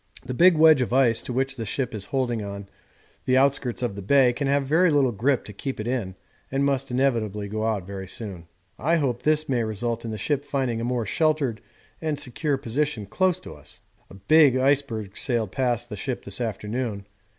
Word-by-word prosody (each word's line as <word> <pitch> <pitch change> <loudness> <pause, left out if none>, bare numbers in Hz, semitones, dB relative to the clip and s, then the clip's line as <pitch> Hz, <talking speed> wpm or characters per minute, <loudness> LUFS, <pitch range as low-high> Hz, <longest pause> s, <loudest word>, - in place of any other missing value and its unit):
The 130 - -4
big 170 +5 +5
wedge 155 -3 +6
of 125 - -1
ice 120 -3 +3
to - - -6
which 135 +2 -1
the 115 - -3
ship 125 +3 -3
is 105 -3 -5
holding 120 -5 -1
on 100 0 -7 0.6
the 130 0 +3
outskirts 135 -2 +1
of 120 -5 -2
the 100 - -6
Bay 125 +4 +4
can 135 +3 -2
have 140 0 +2
very 165 +6 +4
little 140 -4 +3
grip 125 +5 0
to 105 - -9
keep 130 +6 -5
it 105 - -3
in 115 -7 -2 0.4
and 135 +1 +1
must 135 -1 0
inevitably 115 -6 0
go 110 +2 -2
out 105 -5 -1
very 95 0 -7
soon. 95 -6 -6 0.3
I 165 +5 +2
hope 130 -7 0
this 155 +3 +1
may 125 -3 +1
result 115 +2 -3
in 115 - -5
the 110 - -4
ship 140 +7 -1
finding 130 -5 -2
a - - -3
more 120 -1 -1
sheltered 145 0 0 0.4
and 155 -2 -1
secure 140 +2 -2
position 135 -2 -2
close 175 - +1
to - - -9
us. - - -12 0.3
A - - -12
big 135 +7 +5
iceberg 130 -7 0
sailed 115 -7 0
past 120 -1 -1
the 105 - -6
ship 125 +5 -4
this - - -3
afternoon. 110 -1 -3
125 Hz, 205 wpm, -25 LUFS, 110-140 Hz, 0.6 s, wedge